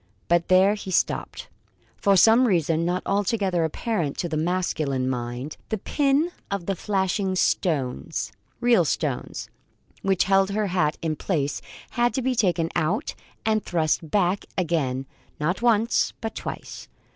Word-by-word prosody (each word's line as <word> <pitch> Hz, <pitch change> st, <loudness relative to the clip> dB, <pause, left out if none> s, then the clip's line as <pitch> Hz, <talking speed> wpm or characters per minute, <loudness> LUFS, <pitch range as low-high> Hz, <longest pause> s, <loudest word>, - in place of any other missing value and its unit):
But 170 Hz, 0 st, +2 dB
there 190 Hz, +2 st, +5 dB
he 205 Hz, -2 st, -6 dB
stopped. 185 Hz, -, -1 dB, 0.5 s
For 200 Hz, -1 st, +3 dB
some 230 Hz, +6 st, +6 dB
reason, 165 Hz, -4 st, +2 dB
not 180 Hz, +2 st, -1 dB
altogether 195 Hz, -3 st, +1 dB
apparent 160 Hz, -, -2 dB
to 175 Hz, -, -1 dB
the 160 Hz, -, -3 dB
masculine 155 Hz, -6 st, 0 dB
mind, 125 Hz, +3 st, -4 dB
the 220 Hz, -, -1 dB
pin 285 Hz, -, +1 dB, 0.2 s
of 200 Hz, -3 st, -2 dB, 0.2 s
flashing 190 Hz, -1 st, 0 dB
stones 155 Hz, -6 st, 0 dB, 0.3 s
(real 240 Hz, -7 st, +4 dB
stones) 150 Hz, -4 st, -2 dB, 0.5 s
which 195 Hz, -2 st, +2 dB
held 195 Hz, 0 st, +3 dB
her 210 Hz, +1 st, 0 dB
hat 155 Hz, -4 st, +1 dB
in 160 Hz, -2 st, 0 dB
place 145 Hz, -6 st, -1 dB, 0.3 s
had 240 Hz, 0 st, +1 dB
to 260 Hz, -, -1 dB
be 260 Hz, +1 st, +1 dB
taken 175 Hz, -7 st, +1 dB
out 175 Hz, +6 st, 0 dB, 0.3 s
and 215 Hz, -1 st, +2 dB
thrust 160 Hz, -1 st, 0 dB
back 195 Hz, 0 st, +1 dB
again, 150 Hz, -7 st, 0 dB, 0.3 s
not 170 Hz, +8 st, -1 dB
once, 230 Hz, -1 st, +2 dB
but 225 Hz, -1 st, -4 dB
twice. -, -, -7 dB
185 Hz, 140 wpm, -25 LUFS, 155-210 Hz, 0.5 s, some